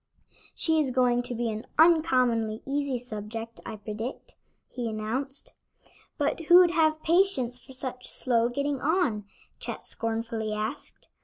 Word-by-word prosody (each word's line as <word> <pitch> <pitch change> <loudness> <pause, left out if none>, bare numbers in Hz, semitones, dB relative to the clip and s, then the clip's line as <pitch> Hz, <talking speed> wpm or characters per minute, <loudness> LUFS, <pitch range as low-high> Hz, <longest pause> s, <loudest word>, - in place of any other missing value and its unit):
"She 320 -1 +2
is 295 -4 +1
going 245 -1 +3
to 245 0 -4
be 230 -1 -1
an 215 +1 -6
uncommonly 255 -9 +3
easy 275 -1 -1
subject, 225 -1 -7
I - - -5
predict," 215 +4 -6 0.4
he 240 -2 -2
announced. 230 +6 -4 0.6
"But 295 +2 -1
who'd 350 +1 +7
have 315 -2 +2
patience 320 -9 +2
for 265 - -14
such 255 -1 -4
slow 235 -2 +2
getting 280 +2 -2
on?" 290 - +1 0.3
Chet - - -5
scornfully 225 -1 -2
asked. 215 0 -5
250 Hz, 135 wpm, -27 LUFS, 225-290 Hz, 0.6 s, who'd